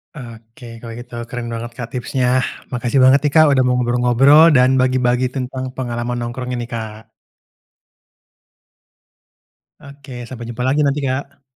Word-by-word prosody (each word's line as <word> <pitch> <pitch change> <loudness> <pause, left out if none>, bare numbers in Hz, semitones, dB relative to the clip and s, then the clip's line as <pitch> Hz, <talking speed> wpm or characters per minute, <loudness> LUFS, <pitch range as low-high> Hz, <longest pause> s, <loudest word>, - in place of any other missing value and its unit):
Oke, 115 -2 -12
kalau 115 0 -9
gitu. 120 0 -13 0.2
Keren 120 -1 -5
banget 115 +1 -6
Kak, 120 -2 -5
tips-nya. 125 0 -2 0.4
Makasih 125 +2 0
banget 130 +2 +6
nih 145 - +1
Kak, 155 - +7
udah 130 -2 +3
mau 125 - +2
ngobrol-ngobrol 125 +4 +4
dan 125 0 +4
bagi-bagi 130 -1 +1
tentang 130 0 -4
pengalaman 120 -1 -3
nongkrong 125 +1 -5
ini 120 -1 -3
Kak. 110 -1 -7 2.7
Oke, 140 -1 -13 0.2
sampai 120 -2 -8
jumpa 120 +1 -6
lagi 140 +3 +1
nanti 140 +1 0
Kak. 130 +2 -5
125 Hz, 140 wpm, -18 LUFS, 120-130 Hz, 2.7 s, Kak